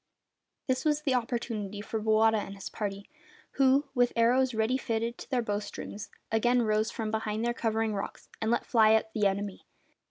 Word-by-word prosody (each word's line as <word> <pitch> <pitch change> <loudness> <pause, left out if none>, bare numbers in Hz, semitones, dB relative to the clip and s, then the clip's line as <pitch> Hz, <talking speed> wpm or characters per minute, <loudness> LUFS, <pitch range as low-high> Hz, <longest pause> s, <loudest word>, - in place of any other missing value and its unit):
This 260 -1 0
was 300 -1 +1
the 275 - +1
opportunity 230 -4 -2
for 220 +1 -3
Bowata 220 +1 +4
and 200 -1 -6
his 195 - -7
party, 200 -2 -5 0.4
who, 275 +2 +3
with 245 -2 +3
arrows 245 +2 +3
ready 220 +3 +1
fitted 230 -2 -1
to - - -10
their 255 -3 +1
bow 205 -2 -1
strings, 205 0 -7 0.2
again 240 +2 +3
rose 215 0 +1
from 220 -2 -4
behind 220 0 -2
the 240 - +1
covering 225 -2 0
rocks 200 -1 -5
and 220 - 0
let 235 - +1
fly 220 -2 +5
at 220 0 +1
the 210 -2 +3
enemy. 195 0 -3
220 Hz, 185 wpm, -29 LUFS, 215-245 Hz, 0.4 s, fly